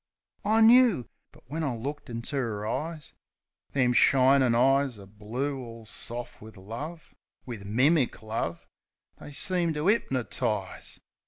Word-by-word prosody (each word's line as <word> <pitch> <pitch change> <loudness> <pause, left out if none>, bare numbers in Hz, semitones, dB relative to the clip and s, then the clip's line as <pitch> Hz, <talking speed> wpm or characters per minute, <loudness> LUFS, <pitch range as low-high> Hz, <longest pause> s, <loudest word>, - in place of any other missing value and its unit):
I 220 +2 +3
knoo. 230 - +6 0.2
But - - -20
when 160 +5 -3
I 135 -5 -1
looked 140 +5 -6
into 115 +4 -4
'er 110 -6 -2
eyes 155 +7 -4 0.3
— - - -48
Them 125 -3 +3
shinin' 130 -1 +5
eyes 135 0 +3
o' 100 - -11
blue 115 +8 -4
all 115 -2 -9
soft 120 +2 -5
wiv 110 0 -12
love 140 - -8 0.2
— - - -45
Wiv 115 -6 -7
mimic 130 +3 +2
love 110 -6 -3 0.3
— - - -40
they - - -10
seemed 175 0 -1
to 150 - -2
'ipnertize. 120 - -1
130 Hz, 150 wpm, -28 LUFS, 115-150 Hz, 0.3 s, knoo